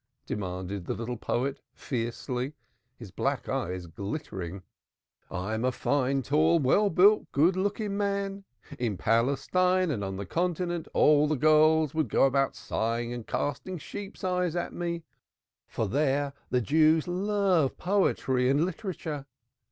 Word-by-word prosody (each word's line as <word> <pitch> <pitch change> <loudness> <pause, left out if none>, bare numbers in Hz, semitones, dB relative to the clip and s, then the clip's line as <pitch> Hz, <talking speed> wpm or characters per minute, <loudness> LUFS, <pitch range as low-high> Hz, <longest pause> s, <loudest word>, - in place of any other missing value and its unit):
demanded 95 -1 -4
the - - -1
little 120 +2 -4
poet 130 +4 -2 0.2
fiercely, 125 +2 -3 0.4
his 115 -7 -11
black - - -2
eyes 90 +1 -2
glittering. 95 - -6 0.7
"I 90 +5 -3
am 110 +1 -2
a 130 - +2
fine 135 +1 0
tall 155 +6 +3
well 165 +9 +3
built 200 +4 +4
good 165 +6 +3
looking 200 +1 -1
man. 200 -1 -1 0.4
In 110 -6 -1
Palestine 175 - +2
and 110 -8 -2
on 95 -1 -3
the 100 - -4
Continent 175 - -1
all 150 0 +5
the 155 - +1
girls 155 +1 +4
would 160 -1 0
go - - +3
about 135 0 +1
sighing 115 +2 -2
and 120 -2 -7
casting 160 +6 -2
sheep's 200 +6 -8
eyes 180 -2 0
at 175 - -2
me, 170 -1 -3 0.6
for 110 - -2
there 140 +4 +1 0.2
the 125 - +2
Jews 155 +5 +3
love 185 -5 +1
poetry 135 -10 +1
and 145 +5 +3
literature. 165 -7 -5
145 Hz, 140 wpm, -28 LUFS, 120-180 Hz, 0.7 s, all